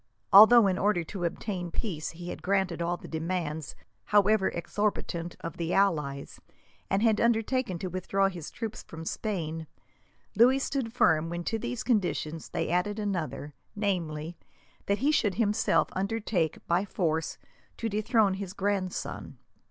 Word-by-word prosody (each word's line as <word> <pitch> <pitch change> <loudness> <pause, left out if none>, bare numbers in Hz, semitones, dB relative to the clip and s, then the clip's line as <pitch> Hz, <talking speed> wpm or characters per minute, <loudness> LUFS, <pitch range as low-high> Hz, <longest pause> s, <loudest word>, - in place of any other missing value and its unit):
Although, 220 +3 +10
in 185 -1 +1
order 200 -4 +2
to 175 +1 -5
obtain 180 0 -3
peace, 165 -4 -3
he 175 +1 -8
had - - -6
granted 190 -3 0
all 175 +1 0
the - - -11
demands, 160 -2 -3 0.3
however 205 -1 +4
exorbitant, 175 -2 -2
of 165 -1 -6
the 170 0 -1
allies, 150 -8 0 0.5
and 195 +3 +1
had 220 -2 +3
undertaken 235 -2 +1
to 185 - -4
withdraw 185 +2 0
his 175 -5 -6
troops 225 -2 -6
from 160 0 -10
Spain, 165 -6 -3 0.7
Louis 245 +5 +6
stood 270 -4 -2
firm 165 -9 +3
when 175 0 -4
to 225 +5 -2
these 245 +2 -4
conditions 175 - -1
they - - -2
added 180 +4 0
another, 180 -8 -3 0.2
namely, 170 -6 -2 0.5
that 200 - +2
he 300 - +5
should 210 -10 +1
himself 220 -1 +2
undertake, 195 -4 -1
by 175 +3 +2
force, 165 -5 -1 0.4
to 230 - -2
dethrone 215 -1 +2
his 190 -1 -5
grandson. 195 -2 -3
190 Hz, 145 wpm, -28 LUFS, 170-210 Hz, 0.7 s, Although